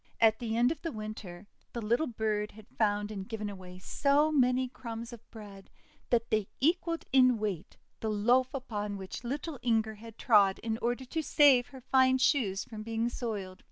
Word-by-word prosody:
At 220 -1 +4
the 230 -2 -2
end 245 +3 +4
of 315 - -5
the 330 - -3
Winter 215 -5 -7 0.3
the 235 - -3
little 235 +8 +1
bird 215 -3 -2
had 215 0 -14
found 210 -1 0
and 195 -1 -6
given 210 -2 -4
away 185 -2 -10
so 285 +10 +2
many 255 -2 +3
crumbs 235 -1 -7
of 235 0 -13
bread 205 -3 -12 0.4
that 230 -1 +1
they 215 -2 +1
equalled 335 +3 +1
in 255 -2 +6
weight 205 -6 -4 0.2
the 220 - -2
loaf 240 +5 +2
upon 210 -6 -4
which 190 +4 -7
little 280 +3 -4
Inger 220 -2 +1
had 225 +1 -12
trod 205 -5 +4
in 225 0 -2
order 245 +2 -1
to 320 +6 -2
save 280 -5 +5
her 265 -2 -12
fine 260 0 +4
shoes 240 -8 +2
from 215 -2 -9
being 225 +1 -1
soiled. 205 -7 -5
230 Hz, 185 wpm, -30 LUFS, 210-255 Hz, 0.4 s, in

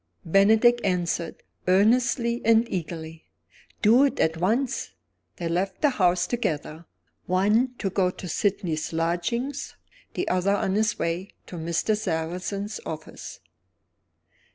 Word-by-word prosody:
Bennydeck 220 +7 +5
answered, 175 -3 -1 0.2
earnestly 235 +5 +3
and 230 +1 +4
eagerly: 165 -2 -5 0.6
"Do 235 +5 +6
it 280 - -1
at 160 0 +2
once!" 215 - -1 0.4
They 170 - -4
left 185 - -2
the 295 - +5
house 180 -5 +2
together 160 -8 -3 0.4
one 210 +8 +2
to 195 - -2
go 185 -1 +2
to 180 - -8
Sydney's 170 -3 -1
lodgings, 175 - -2 0.4
the - - -2
other 185 +2 +2
on 190 -1 -1
his 215 +2 +1
way 175 +4 -2 0.2
to - - -9
Mr. 170 +6 0
Sarrazin's 185 +2 -3
office. 160 0 -8
190 Hz, 120 wpm, -25 LUFS, 170-220 Hz, 0.6 s, Do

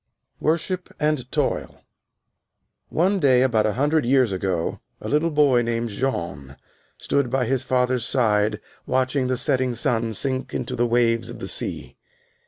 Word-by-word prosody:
"_ - - -61 0.4
WORSHIP 170 +4 -1
AND 150 -4 -1
TOIL - - -2 1.1
One 190 +4 +1
day 130 -5 +4
about 115 -5 +2
one 105 -1 0
hundred 150 +4 +2
years 130 -2 +3
ago 95 -3 -2 0.2
a - - -7
little 150 +3 +1
boy 145 -5 +4
named 115 0 -2
Jean 85 - -3 0.4
stood 140 -3 0
by 130 0 0
his 130 +1 0
father's 125 -1 +1
side 105 -4 +2 0.3
watching 130 +1 +1
the 130 0 0
setting 130 0 0
sun 115 -3 0
sink 130 +4 -3
into 130 - -3
the 120 0 +1
waves 115 -1 +1
of - - -8
the - - -6
sea. - - -4
125 Hz, 155 wpm, -23 LUFS, 115-135 Hz, 1.1 s, day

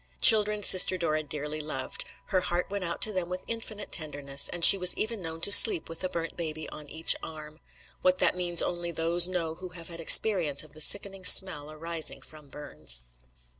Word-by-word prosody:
Children 210 -1 +4
Sister 185 0 +5
Dora 155 -3 -4
dearly 150 +1 -5
loved; 140 -3 -6 0.2
her 185 -2 -2
heart 180 +1 -6
went 200 -1 -6
out 170 -1 -3
to 215 - 0
them 180 -2 -6
with 180 0 -8
infinite 220 -2 -9
tenderness, 145 -3 -2
and 170 -1 +2
she - - +10
was 180 -2 +3
even 220 -1 -6
known 165 -1 -10
to 200 - -1
sleep 370 - +6
with 165 +2 -9
a 185 - -5
burnt 165 -1 -8
baby 155 -2 -8
on 150 -1 -12
each 160 +1 -1
arm. 155 -1 -12 0.4
What 185 0 -1
that - - -1
means 175 -1 0
only 175 -1 -6
those 170 +1 0
know 170 -3 -6
who 180 +2 -12
have 165 0 -11
had 170 -1 -10
experience 165 -4 +4
of 155 - -11
the 155 - -13
sickening 195 +2 +2
smell 180 -5 +5
arising 160 +1 -6
from 150 -2 -18
burns. 75 - -8
170 Hz, 200 wpm, -25 LUFS, 155-185 Hz, 0.4 s, she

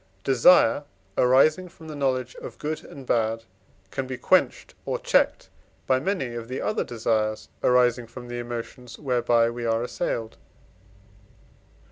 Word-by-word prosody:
Desire 135 0 +5 0.3
arising 150 +8 +4
from 165 -2 -14
the 155 - -7
knowledge 130 -3 -1
of - - -9
good 155 +1 -4
and 135 -2 -11
bad 115 -1 0 0.5
can 135 - -3
be 130 -1 -5
quenched - - +1
or - - -2
checked - - +1 0.4
by 130 0 +2
many 140 -6 -2
of 115 -1 -6
the 130 +2 -4
other 215 - -1
desires 110 -2 -1
arising 125 -1 +3
from 120 +2 -10
the 120 0 -5
emotions 120 +1 -7
whereby 120 -4 +2
we 120 0 -4
are 115 0 0
assailed. 115 -2 -3
125 Hz, 140 wpm, -25 LUFS, 115-135 Hz, 0.5 s, Desire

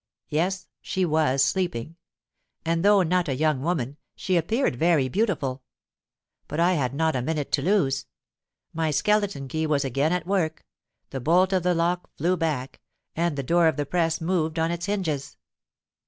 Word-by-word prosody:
Yes—she 185 +3 -2
was 150 -4 +2
sleeping; 165 -6 -2 0.7
and, 165 +1 0
though 200 -1 +5
not 180 -1 +1
a 135 - 0
young 150 -1 +1
woman, 145 -4 -2 0.2
she 185 - -1
appeared 175 - +1
very 155 -1 +3
beautiful. 140 - -1 0.9
But 150 - -4
I 175 +2 +4
had 135 -5 -1
not 160 0 +1
a 125 - 0
minute 150 +2 -2
to 140 - +2
lose: 140 -7 +1 0.7
my 160 -1 0
skeleton 205 -3 +1
key 160 +4 -2
was 145 -2 +1
again 140 +4 +1
at 180 -2 -1
work—the 160 -6 -4
bolt 180 +8 +3
of 185 - +2
the 180 0 +1
lock 175 +2 0
flew 175 +5 +1
back—and 155 +1 -3
the 140 - -2
door 170 +4 +3
of 160 - +1
the 145 - -1
press 165 +1 0
moved 160 -2 -1
on 165 +1 +1
its 170 +2 -3
hinges. 155 -9 -2
160 Hz, 160 wpm, -25 LUFS, 145-180 Hz, 0.9 s, though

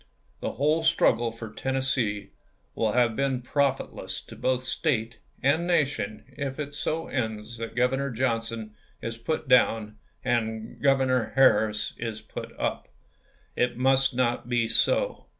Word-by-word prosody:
The - - -3
whole 150 +5 +2
struggle 120 -6 +3
for 115 -1 -8
Tennessee 125 -7 -1 0.4
wiU 110 -1 0
have 120 -3 +3
been 135 -1 0
profit 140 +1 0
less - - -5
to - - -12
both 130 0 0
State 115 -5 -1 0.2
and 155 +6 +3
Nation 140 - 0
if 135 -2 -5
it 145 -1 -4
so 160 +3 -2
ends 110 -2 -3
that 115 0 -6
Governor 135 +3 +1
Johnson 115 -3 -2 0.3
is 115 0 -3
put 150 +6 -3
down 110 -4 +3 0.3
and 110 -2 -1
Governor 130 -3 +2
Harris 110 -5 +4
is 115 -2 -4
put - - -8
up. - - -2 0.7
It 125 0 +1
must 130 0 +3
not 120 -1 0
be 120 -2 +2
so. - - +1
125 Hz, 140 wpm, -27 LUFS, 115-135 Hz, 0.7 s, Harris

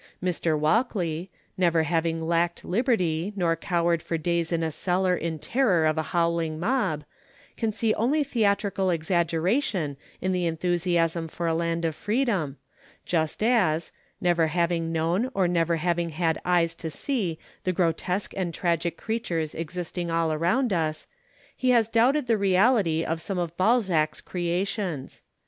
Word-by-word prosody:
Mr. 170 -3 0
Walkley, 175 - 0 0.3
never 170 -3 +3
having 165 0 0
lacked 170 +1 0
Liberty, 190 -5 0
nor 170 -4 +1
cowered 170 0 0
for 165 - -2
days 170 +1 -1
in 165 -1 0
a 160 - -1
cellar 180 +3 +1
in 165 -1 -3
terror 190 - +2
of 155 0 +2
a 160 - 0
howling 170 -2 0
mob, 190 - 0 0.5
can 225 -2 -1
see 215 +1 +1
only 285 +7 +1
theatrical 200 -6 +1
exaggeration 170 - 0 0.2
in 185 - -1
the 180 -2 0
enthusiasm 170 0 0
for 170 +2 -5
a 165 - +2
land 170 0 -1
of 160 - 0
freedom, 205 - -1 0.5
just 160 +3 0
as, 185 -9 +2 0.3
never 170 -2 +2
having 170 0 0
known 170 +9 0
or 190 -2 +3
never 170 -1 +1
having 170 +1 0
had 160 0 -1
eyes 175 -2 +2
to 165 -1 -5
see 185 - -2 0.3
the 185 - +1
grotesque 180 +2 -1
and 175 -4 -2
tragic 170 -1 0
creatures 175 -9 -2
existing 175 +1 -4
all 165 -1 +1
around 195 - +1
us, 155 -3 -1 0.5
he 255 - 0
has 235 -3 +4
doubted 245 +6 +3
the 225 -3 +2
reality 190 -4 +3
of 165 0 -2
some 195 +3 -3
of 170 -2 -2
Balzac's 185 -7 +2
creations. 180 -3 -3
175 Hz, 150 wpm, -26 LUFS, 165-195 Hz, 0.5 s, has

